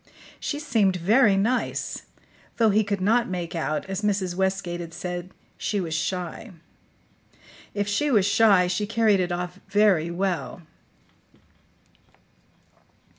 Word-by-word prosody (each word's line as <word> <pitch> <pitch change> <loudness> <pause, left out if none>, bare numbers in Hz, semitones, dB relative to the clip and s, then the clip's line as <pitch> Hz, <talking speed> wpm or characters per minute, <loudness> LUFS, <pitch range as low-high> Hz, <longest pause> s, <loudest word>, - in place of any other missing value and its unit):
She 290 - -3
seemed 225 -10 +1
very 205 +4 +4
nice, 230 +6 -1 0.5
though 225 -2 +4
he 215 +2 +3
could 200 -1 -2
not 230 +4 +2
make 175 -1 -4
out, 155 -1 -2
as 190 -1 -4
Mrs. 195 -4 0
Westgate 190 -1 -1
had 165 -1 -8
said, 175 0 -5 0.3
she 205 - -1
was 165 -4 -3
shy. 180 +6 -3 1.3
If 205 -1 -1
she 250 +9 0
was 210 -8 +3
shy, 200 -2 +5
she 185 +4 -1
carried 220 -2 +3
it 180 -1 -1
off 180 +1 -4
very 200 -5 +3
well. 180 0 -3
195 Hz, 125 wpm, -25 LUFS, 180-210 Hz, 1.3 s, shy